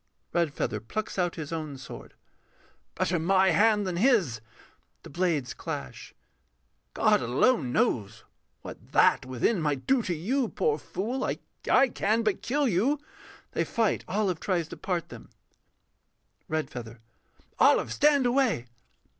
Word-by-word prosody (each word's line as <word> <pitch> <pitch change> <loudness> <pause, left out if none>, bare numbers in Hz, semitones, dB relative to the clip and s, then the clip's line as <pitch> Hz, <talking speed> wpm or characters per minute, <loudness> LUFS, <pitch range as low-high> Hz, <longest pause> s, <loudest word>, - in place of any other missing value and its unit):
REDFEATHER 150 -10 -1
[plucks 195 - -4
out 175 -1 0
his 155 0 -6
own 155 -4 -4
sword]. 130 - -11 0.8
Better 175 0 0
my 190 +3 +3
hand 210 -1 +3
than 180 -2 -2
his. 190 - +2 0.6
[The - - -11
blades 160 -6 0
clash.] 65 -2 -7 0.8
God - - +3
alone 130 - +2
knows 110 -2 0 0.4
What - - -11
That 130 - +4
within 130 - 0
might 145 -4 -1
do 265 -2 +3
to 180 -6 -2
you, 235 - -1
poor 150 0 0
fool, 240 - -3
I - - -1 0.5
can 220 +1 0
but 215 -3 0
kill 280 +4 0
you. 240 +9 +1 0.5
[They - - 0
fight. 225 -2 0
OLIVE 190 -4 0
tries 175 -5 -1
to - - -7
part 175 -3 -3
them.] - - -11 1.2
REDFEATHER. 125 -7 -4 0.6
Olive, - - +4
stand 290 -3 +4
away! 245 - +2
180 Hz, 130 wpm, -27 LUFS, 145-225 Hz, 1.2 s, That